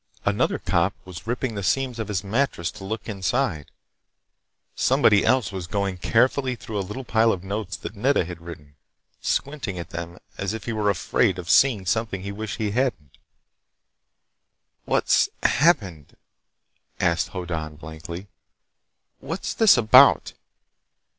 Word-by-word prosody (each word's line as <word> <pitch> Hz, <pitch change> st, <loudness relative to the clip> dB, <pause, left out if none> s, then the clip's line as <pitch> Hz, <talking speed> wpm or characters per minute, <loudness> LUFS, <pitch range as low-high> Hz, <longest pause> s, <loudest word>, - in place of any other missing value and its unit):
Another -, -, +1 dB
cop -, -, 0 dB
was 90 Hz, +3 st, -10 dB
ripping 120 Hz, 0 st, -2 dB
the 100 Hz, -, -4 dB
seams 125 Hz, +4 st, 0 dB
of 110 Hz, -, -3 dB
his 105 Hz, -2 st, -2 dB
mattress 100 Hz, -, -1 dB
to -, -, -12 dB
look 110 Hz, +3 st, -5 dB
inside. 100 Hz, -, -1 dB, 1.0 s
Somebody 105 Hz, -2 st, +3 dB
else 130 Hz, -6 st, +2 dB
was 95 Hz, -3 st, -5 dB
going 100 Hz, -1 st, -2 dB
carefully 130 Hz, +5 st, +2 dB
through 110 Hz, -3 st, -5 dB
a -, -, 0 dB
little 105 Hz, +8 st, -6 dB
pile 115 Hz, -1 st, +3 dB
of 90 Hz, -3 st, -3 dB
notes 95 Hz, -2 st, -4 dB
that 105 Hz, -, -8 dB
Nedda 125 Hz, -2 st, +2 dB
had 85 Hz, -1 st, -8 dB
written, 75 Hz, -4 st, -11 dB, 0.4 s
squinting 135 Hz, -10 st, -2 dB
at 85 Hz, 0 st, -7 dB
them 85 Hz, +1 st, -6 dB, 0.2 s
as 100 Hz, +1 st, -2 dB
if 110 Hz, -, -7 dB
he 115 Hz, -, -2 dB
were 105 Hz, -1 st, +1 dB
afraid 95 Hz, 0 st, +1 dB
of 85 Hz, -2 st, -3 dB
seeing 120 Hz, -9 st, +4 dB
something 100 Hz, -1 st, -1 dB
he'd 100 Hz, -, -4 dB
wish 105 Hz, 0 st, -5 dB
he 110 Hz, -3 st, -1 dB
hadn't. 115 Hz, -, -2 dB, 1.7 s
"What's -, -, +2 dB
happened?" 100 Hz, -, +1 dB, 0.8 s
asked 85 Hz, -2 st, +1 dB
Hoddan 80 Hz, -5 st, -5 dB
blankly. 80 Hz, +4 st, -8 dB, 0.9 s
"What's 165 Hz, +7 st, -4 dB
this 220 Hz, -, +6 dB
about?" 110 Hz, -2 st, +6 dB
100 Hz, 140 wpm, -24 LUFS, 90-115 Hz, 1.7 s, this